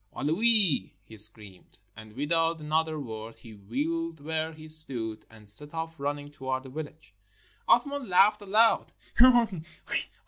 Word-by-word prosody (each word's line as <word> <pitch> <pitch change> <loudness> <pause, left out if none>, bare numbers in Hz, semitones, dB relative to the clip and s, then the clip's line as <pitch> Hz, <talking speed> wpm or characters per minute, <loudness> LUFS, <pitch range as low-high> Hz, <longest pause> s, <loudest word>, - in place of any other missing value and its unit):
"Aloui!" 185 - +1
he 110 - -15
screamed. 105 -3 +2 0.2
And 110 0 -13
without 165 +4 -1
another 155 +1 -2
word 115 -3 -8
he 115 - -15
wheeled 155 +11 -4
where 160 +2 -4
he 155 0 -13
stood, 130 -9 +2
and 110 -2 -9
set 145 +10 +4
off 165 0 -5
running 145 +1 -5
towards 130 -2 -5
the 135 - -11
village. 155 +2 -10 0.6
Athman 285 -3 +1
laughed 195 +4 +3
aloud. 215 +3 +2
150 Hz, 130 wpm, -27 LUFS, 115-165 Hz, 0.6 s, set